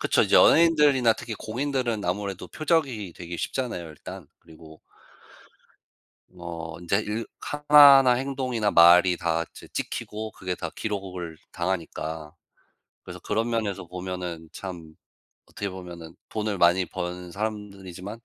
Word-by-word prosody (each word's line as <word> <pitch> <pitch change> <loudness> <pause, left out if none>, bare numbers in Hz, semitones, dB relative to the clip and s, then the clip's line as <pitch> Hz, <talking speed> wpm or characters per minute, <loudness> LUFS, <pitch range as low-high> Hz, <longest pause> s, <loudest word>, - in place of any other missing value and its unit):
그쵸. - - +3
이제 - - +1
연예인들이나 150 -8 +6
특히 110 0 -7
공인들은 120 -2 -2
아무래도 95 +1 -3
표적이 140 - -1
되기 85 -1 -7
쉽잖아요 120 -10 -3
일단. 75 - -10
그리고 80 -1 -15 1.6
어 85 -2 -7
인제 90 +3 +1
일 110 +2 -3
하나하나 145 -3 +7
행동이나 130 -4 -1
말이 90 +1 +7
다 85 -1 -1
찌 - - -13
찍히고 110 +1 -4
그게 90 -1 -4
다 85 -2 -5
기록을 95 -6 -5 0.2
당하니까. 80 -3 -4 0.7
그래서 - - -9
그런 115 +3 -1
면에서 105 -5 -2
보면은 90 -2 -6
참 85 -5 -8 0.5
어떻게 100 -1 -5
보면은 85 -3 -9
돈을 105 -3 -3
많이 90 +2 +4
번 90 0 -6
사람들이지만 100 -1 -6
95 Hz, 305 characters per minute, -25 LUFS, 85-115 Hz, 1.6 s, 하나하나